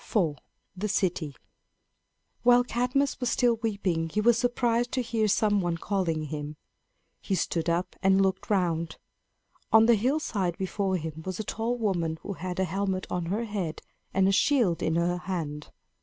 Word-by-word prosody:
IV. 170 -10 +1 0.4
THE 200 +3 -2
CITY. 175 -7 -1 1.1
While 245 +1 +6
Cadmus 250 +3 0
was 250 -2 0
still 240 -1 +2
weeping 195 -7 -1
he 210 - -1
was 235 +2 +5
surprised 240 0 +1
to 255 - 0
hear 225 -2 0
some 205 0 +2
one 175 -2 -1
calling 170 -4 -1
him. 150 0 -5 0.6
He 195 - -2
stood 170 -2 -1
up 170 +2 -1
and 190 0 +4
looked 190 -1 0
around. 170 -5 0 0.7
On 220 0 +7
the 235 - +6
hillside 215 - 0
before 190 0 -1
him 160 -1 -6
was 185 +1 -5
a - - -1
tall 230 +4 -2
woman 175 -8 -1
who 200 - -4
had 180 0 -5
a - - +3
helmet 190 +1 -1
on 175 -2 -2
her 205 +6 -1
head 200 -8 -4 0.3
and 190 0 +3
a - - +4
shield 225 - +2
in 160 - 0
her 175 +1 +1
hand. 160 -5 -4
190 Hz, 170 wpm, -27 LUFS, 170-225 Hz, 1.1 s, On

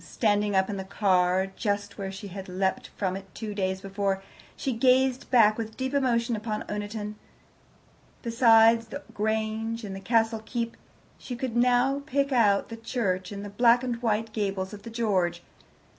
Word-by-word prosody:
Standing 205 +2 +1
up 190 0 +3
in 205 - -4
the 190 - -4
car, 190 -2 +2
just 200 +1 -3
where 195 -1 -3
she 200 +1 -8
had 190 0 -8
leapt 190 +1 -1
from 190 -2 -1
it 195 -1 -10
two 215 -2 -5
days 190 -1 -1
before, 195 0 -2 0.3
she 265 - -1
gazed 255 +2 +2
back 225 -3 +5
with 220 -1 -5
deep 260 +1 -2
emotion 240 -4 +1
upon 215 0 -3
Oniton. 210 0 -4 1.1
Besides 230 -1 +5
the 285 +5 -7
Grange 220 +2 -1
and 195 -2 -5
the - - -6
Castle 225 +1 +1
keep, 230 0 -3 0.4
she 250 - -6
could 240 -1 -4
now 250 +3 +3
pick 280 0 0
out 210 -6 +3
the 230 - -7
church 200 -6 -2
and 200 0 -6
the 205 - -7
black 235 +3 +4
and 240 -2 -3
white 220 -1 0
gables 195 -2 -2
of 205 - -9
the 230 - -9
George. 190 -7 0
215 Hz, 175 wpm, -27 LUFS, 195-235 Hz, 1.1 s, back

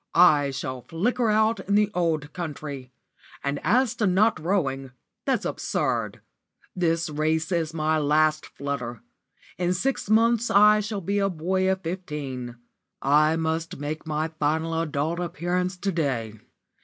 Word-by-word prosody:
"I 150 -5 +6
shall 130 -1 -4
flicker 220 - 0
out 220 +1 +3
in 200 - -1
the 210 0 +3
old 160 -4 -1
country. 145 -6 -6 0.5
And 140 0 -1
as 250 0 +3
to 215 -5 +2
not 205 +5 +3
rowing, 135 -8 -1 0.3
that's - - 0
absurd. - - -2 0.5
This 165 -2 +1
race 155 +2 -1
is 165 -3 0
my 155 -1 +1
last 155 +1 +2
flutter. 125 -4 -5 0.6
In 180 0 +1
six 255 +2 -1
months 230 +1 +3
I 210 +1 +6
shall 210 -1 -3
be 200 +4 0
a 195 0 +2
boy 185 +2 0
of 190 0 -2
fifteen. 150 -9 -5 0.4
I 150 +3 +4
must 160 0 -2
make 150 +3 -5
my 155 +1 -1
final 160 +1 -1
adult 160 +2 -2
appearance 180 +1 -2
to 195 +2 -1
day. 130 - -1
165 Hz, 145 wpm, -25 LUFS, 150-190 Hz, 0.6 s, I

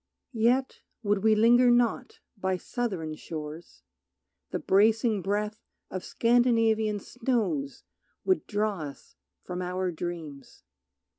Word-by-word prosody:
Yet 245 +4 +1 0.2
would 205 -2 +1
we 220 -1 +5
linger 240 +3 +5
not 240 +1 +1
by 190 -2 -1
southern 190 -8 -3
shores; 155 - -8 0.7
The - - -2
bracing 215 +1 +3
breath 210 +3 -2 0.3
of 185 -1 -4
Scandinavian 225 -3 +2
snows 260 +5 -2 0.4
Would 375 -1 +1
draw 210 -2 -1
us 145 -3 -9 0.3
from 180 0 -5
our 180 0 -2
dreams. 160 -5 -7
210 Hz, 105 wpm, -28 LUFS, 180-235 Hz, 0.7 s, we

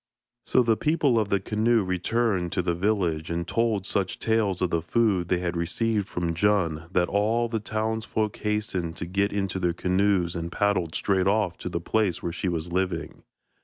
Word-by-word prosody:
So 125 - +4
the 115 -2 +2
people 150 -6 +2
of 105 -2 -1
the 100 - +2
canoe 110 +3 +1
returned 95 0 0
to 90 - 0
the 85 0 0
village, 85 -4 0
and 85 +1 -2
told 110 -4 0
such 100 -3 -1
tales 110 -5 +1
of 90 -2 0
the 85 - +1
food 95 -1 +1
they 90 - +2
had 90 0 -2
received 100 +5 -1
from 85 -1 -2
Djun 85 -4 0
that 90 -1 +2
all 110 +4 +1
the 115 -1 -2
townsfolk 110 0 -2
hastened 105 -6 -2
to - - -4
get 100 +3 0
into 95 -2 -2
their 90 -2 +1
canoes 90 -1 +1
and 85 0 -4
paddled 95 -6 0
straight 95 -2 +1
off 100 -3 +1
to - - -4
the 85 - -2
place 95 0 0
where 85 - -2
she 90 - -3
was 85 0 -3
living. 95 +1 -2
95 Hz, 190 wpm, -26 LUFS, 85-110 Hz, -, So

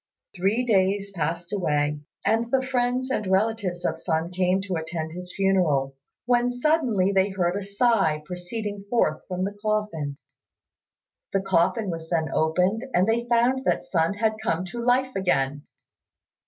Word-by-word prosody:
Three 200 +7 +1
days 200 -2 +2
passed 170 0 -3
away, 150 -6 0 0.3
and 230 +1 +2
the 260 +1 +2
friends 255 0 0
and 210 -6 -1
relatives 190 -2 0
of 160 0 -1
Sun 165 0 -1
came 185 +1 +1
to 195 -2 -4
attend 160 0 -4
his 180 +2 -7
funeral, 165 -9 +2 0.3
when 245 0 +3
suddenly 245 - +2
they 195 0 +3
heard 180 -2 0
a 200 - -2
sigh 200 -6 +1
proceeding 200 +4 -5
forth 155 -10 +1
from 180 0 -2
the 200 +2 -3
coffin. 210 -10 -1 1.2
The 195 - +2
coffin 195 +3 +1
was 165 -1 -6
then 160 -2 0
opened 180 +7 +2
and 185 +3 +4
they 235 +1 +1
found 240 +2 +2
that - - +1
Sun 170 -5 0
had 220 +1 0
come 180 -4 -1
to 240 - -3
life 255 +2 +2
again. 145 -6 0
195 Hz, 155 wpm, -25 LUFS, 170-225 Hz, 1.2 s, and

